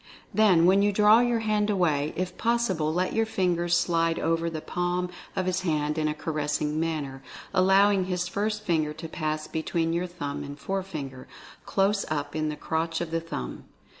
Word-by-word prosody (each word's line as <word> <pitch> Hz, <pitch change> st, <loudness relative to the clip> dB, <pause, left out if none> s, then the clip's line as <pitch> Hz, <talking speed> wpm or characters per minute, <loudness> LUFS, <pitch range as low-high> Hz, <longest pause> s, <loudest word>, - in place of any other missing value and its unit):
Then, 190 Hz, -6 st, +5 dB
when 190 Hz, +2 st, +5 dB
you 205 Hz, 0 st, +3 dB
draw 210 Hz, +2 st, +6 dB
your 240 Hz, -1 st, +2 dB
hand 215 Hz, -1 st, +1 dB
away, 155 Hz, -7 st, +1 dB
if 180 Hz, 0 st, -3 dB
possible 215 Hz, -10 st, +1 dB
let 180 Hz, +3 st, 0 dB
your 225 Hz, 0 st, +1 dB
fingers 175 Hz, -4 st, +1 dB
slide 165 Hz, -1 st, +1 dB
over 165 Hz, 0 st, 0 dB
the 160 Hz, -1 st, -4 dB
palm 180 Hz, +2 st, -2 dB, 0.2 s
of 185 Hz, -, 0 dB
his 185 Hz, 0 st, 0 dB
hand 150 Hz, -3 st, 0 dB
in 155 Hz, -, +1 dB
a 150 Hz, -, -1 dB
caressing 150 Hz, -1 st, -1 dB
manner, 150 Hz, -5 st, -3 dB, 0.3 s
allowing 195 Hz, +1 st, +4 dB
his 180 Hz, -1 st, -1 dB
first 210 Hz, +3 st, -2 dB
finger 155 Hz, -5 st, 0 dB
to 165 Hz, +1 st, -7 dB
pass 155 Hz, -1 st, -3 dB
between 165 Hz, +1 st, -1 dB
your 175 Hz, +2 st, -1 dB
thumb 145 Hz, -5 st, -5 dB
and 145 Hz, 0 st, -8 dB
forefinger, 155 Hz, -7 st, -5 dB, 0.4 s
close 195 Hz, +1 st, +2 dB
up 145 Hz, -1 st, -3 dB
in 155 Hz, 0 st, 0 dB
the 150 Hz, -, -3 dB
crotch 160 Hz, +1 st, -2 dB
of 170 Hz, -2 st, -4 dB
the 165 Hz, 0 st, 0 dB
thumb. 65 Hz, -, -6 dB
170 Hz, 180 wpm, -27 LUFS, 155-190 Hz, 0.4 s, draw